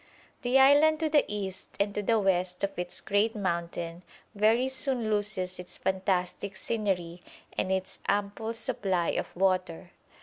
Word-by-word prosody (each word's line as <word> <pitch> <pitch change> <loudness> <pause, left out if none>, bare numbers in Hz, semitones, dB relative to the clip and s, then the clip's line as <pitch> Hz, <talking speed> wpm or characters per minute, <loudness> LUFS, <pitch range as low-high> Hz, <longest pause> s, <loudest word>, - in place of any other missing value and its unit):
The 250 +1 +3
island 290 +3 +6
to 315 - +1
the 295 -1 +4
east 195 -2 -5
and 200 0 +1
to 210 - -1
the 225 +3 +2
west 185 -2 0
of 200 - +1
its 180 0 -3
great 210 +3 +1
mountain 170 -3 -3 0.3
very 220 +5 +3
soon 260 -4 +1
loses 205 -3 +1
its 180 - -7
fantastic 190 0 -1
scenery 180 -7 -2 0.3
and 190 - -1
its 190 0 -2
ample 205 +3 -1
supply 190 -6 -1
of - - -3
water. 185 -2 0
200 Hz, 145 wpm, -29 LUFS, 180-225 Hz, 0.3 s, island